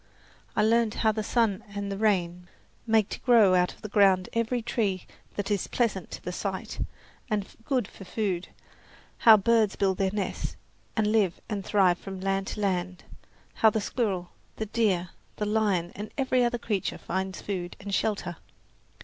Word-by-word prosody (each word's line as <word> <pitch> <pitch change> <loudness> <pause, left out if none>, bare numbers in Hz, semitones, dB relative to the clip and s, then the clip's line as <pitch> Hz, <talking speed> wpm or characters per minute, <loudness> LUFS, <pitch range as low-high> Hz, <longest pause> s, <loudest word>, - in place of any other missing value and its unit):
I 210 - +3
learned 225 0 +3
how 220 - +6
the 215 0 -2
sun 220 -1 +1
and 200 0 -3
the - - -2
rain 180 -5 +1 0.4
make 220 -2 +4
to - - -5
grow 225 -7 +5
out 180 0 +3
of - - -25
the - - -3
ground 195 -3 +4
every 230 +1 0
tree 200 -6 -1 0.3
that 205 +1 -2
is 200 -3 0
pleasant 210 -7 -1
to - - -8
the 180 - -3
sight 190 +1 -4 0.5
and 210 -3 0 0.2
good 255 -7 0
for - - -12
food, 185 -2 -2 0.7
how 220 -2 +9
birds 220 0 +3
build 190 -2 +1
their 195 -1 +2
nests 205 -1 -3 0.4
and 220 - +3
live 205 -6 +2
and 205 -3 -2
thrive 185 -4 +3
from 190 -1 -7
land 195 0 -1
to 210 - -4
land, 185 -2 -1 0.5
how 220 - +5
the 220 - 0
squirrel, 200 -5 -2 0.2
the 220 - -3
deer, 200 -5 +1 0.3
the 210 - -2
lion 205 -5 +1
and 210 +1 -6
every 255 -2 +2
other 240 0 +1
creature 210 -5 -2
finds 190 +1 -3
food 180 -3 -4
and 200 0 -6
shelter. 195 -4 -1
200 Hz, 175 wpm, -27 LUFS, 185-220 Hz, 0.7 s, how